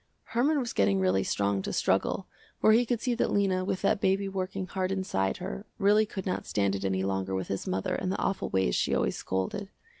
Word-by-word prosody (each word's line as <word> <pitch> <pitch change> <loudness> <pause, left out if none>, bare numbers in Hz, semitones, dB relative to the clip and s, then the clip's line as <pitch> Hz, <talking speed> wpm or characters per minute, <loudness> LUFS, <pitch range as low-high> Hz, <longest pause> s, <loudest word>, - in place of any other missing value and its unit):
Herman 280 +6 +3
was 240 -3 -3
getting 100 -1 +3
really 95 +1 +2
strong 100 -1 0
to - - -4
struggle, - - +1 0.3
for 215 - +5
he 235 +2 +4
could 240 -1 0
see 245 +1 0
that 235 - 0
Lena 190 -2 +2
with 185 0 -2
that 200 - +2
baby 195 +1 +2
working 190 0 -3
hard 185 0 -2
inside 140 - -1
her, 60 - -6
really 210 +2 +4
could 190 -3 -6
not 185 - -2
stand 100 -1 +1
it 100 0 -3
any 95 -1 0
longer 95 0 -1
with 95 - -3
his 95 - -3
mother 95 +1 -1
and 185 - -1
the - - -1
awful 195 - -1
ways 95 -10 +1
she - - +1
always - - +1
scolded. 95 - -3
185 Hz, 220 wpm, -29 LUFS, -, 0.3 s, for